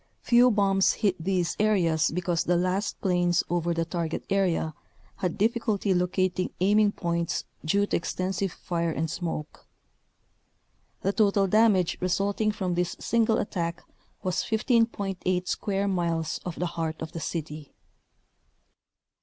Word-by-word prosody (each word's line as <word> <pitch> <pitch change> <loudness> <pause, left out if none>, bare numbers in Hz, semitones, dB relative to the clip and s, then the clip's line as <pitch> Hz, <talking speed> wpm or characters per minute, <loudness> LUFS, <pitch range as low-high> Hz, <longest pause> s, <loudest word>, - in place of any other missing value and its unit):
Few 245 +1 +5
bombs 195 -3 +3
hit 195 -6 -1
these 180 -2 0
areas 175 -7 +2
be 180 +4 -2
cause 170 -2 0
the 175 - +1
last 185 +4 -1
planes 175 -3 +2
over 175 0 0
the 165 0 0
target 165 -2 -3
area 180 -5 +1 0.4
had 180 -2 -2
difficulty 215 -2 +1
locating 185 0 0
aiming 205 +2 +4
points 170 -1 -2 0.2
due 200 +6 +2
to - - 0
exten 185 +2 -3
sive 195 0 -1
fire 170 -1 -2
and 160 0 -2
smoke. 165 -3 -5 1.3
The 195 - 0
total 200 -2 +3
damage 200 -3 +3
result 195 +3 0
ing 215 -1 +3
from 185 -4 -2
this 175 0 -1
single 225 -1 +2
attack 170 -3 -3 0.4
was 185 -2 -1
15.8 200 -6 0
square 200 -1 -1
miles 170 -4 -1
of 175 -2 -5
the 180 - -2
heart 165 -2 -3
of 160 - -7
the 170 - -6
city. 155 -2 -5
180 Hz, 140 wpm, -27 LUFS, 170-200 Hz, 1.3 s, Few